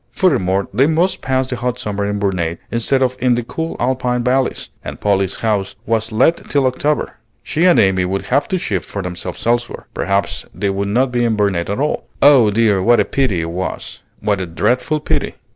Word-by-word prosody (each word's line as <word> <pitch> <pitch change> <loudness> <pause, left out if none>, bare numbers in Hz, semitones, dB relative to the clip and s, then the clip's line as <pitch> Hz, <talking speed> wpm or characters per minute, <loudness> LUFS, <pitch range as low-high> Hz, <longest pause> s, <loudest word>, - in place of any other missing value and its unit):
Furthermore, 95 - +1
they 130 +7 +4
must 165 +4 +1
pass 130 0 0
the 130 - -4
hot 125 0 -2
summer 105 -4 -3
in 105 0 -1
Burnet 90 -5 -1
instead 130 +3 +1
of 130 0 0
in 125 -1 +3
the 120 - -2
cool 160 +7 -4
Alpine 125 -1 0
valleys; 130 +1 0
and - - -7
Polly's 100 -2 +1
house 105 -3 0
was 115 0 0
let 135 +10 +2
till 140 -2 +2
October. 145 +3 -1 0.3
She 165 +4 0
and 180 - +6
Amy 95 -2 +3
would 95 +2 -2
have 140 +3 +1
to 185 - 0
shift 100 - -3
for 100 - -4
themselves 90 0 -5
elsewhere. 120 +1 -1
Perhaps 100 0 -1
they 100 +2 -1
would 100 +1 -2
not 125 +5 +1
be 120 -1 +1
in 115 -2 +1
Burnet 100 -5 0
at 100 - -2
all. 150 +2 -1
Oh 135 -6 +6
dear, 105 -2 +2
what 120 +4 +4
a - - +3
pity 125 -11 0
it 85 0 -4
was! 90 +2 -5 0.2
what 105 -2 0
a 90 - -3
dreadful 125 - 0
pity! - - -1
115 Hz, 205 wpm, -18 LUFS, 100-130 Hz, 0.3 s, and